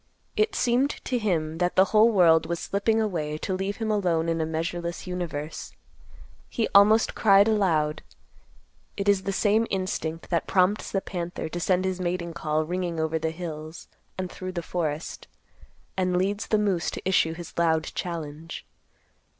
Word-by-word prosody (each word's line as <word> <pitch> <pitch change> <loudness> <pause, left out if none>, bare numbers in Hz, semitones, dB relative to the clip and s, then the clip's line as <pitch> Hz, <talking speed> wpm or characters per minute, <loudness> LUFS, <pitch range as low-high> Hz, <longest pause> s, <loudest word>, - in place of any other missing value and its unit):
It 430 -2 +1
seemed 250 +3 +2 0.2
to 250 -2 0
him 165 -6 -1
that 180 0 0
the 190 - +6
whole 220 +2 +6
world 165 -6 +5
was 170 0 -2
slipping 220 +3 0
away 160 -8 -1
to 190 - -3
leave 195 +2 -2
him 220 -1 -1
alone 170 -5 +1
in 165 -1 0
a 160 - -1
measureless 170 +2 -3
universe. 170 -4 -5 0.8
He 230 - 0
almost 210 +3 +6
cried 200 -1 +5
aloud. 165 -9 +1 1.0
It 200 0 -2
is 200 -2 +4
the 195 - -2
same 215 +3 +2
instinct 185 -4 -3
that 170 - 0
prompts 190 +3 +2
the 195 - 0
panther 175 -3 -4
to 175 - -4
send 185 +1 +1
his 185 -1 -2
mating 175 -1 -2
call 155 -2 -1
ringing 175 -1 -2
over 160 0 0
the 160 +1 -1
hills 160 -1 -7 0.3
and 185 -1 -4
through 185 0 -6
the 170 -2 -3
forest, 160 -2 -3 0.7
and 185 -1 +1
leads 200 +3 -1
the 215 - +2
moose 195 -5 +1
to - - -6
issue 160 -4 +3
his 170 -1 -9
loud 160 -2 +2
challenge. 165 -2 -5
180 Hz, 165 wpm, -26 LUFS, 165-200 Hz, 1.0 s, the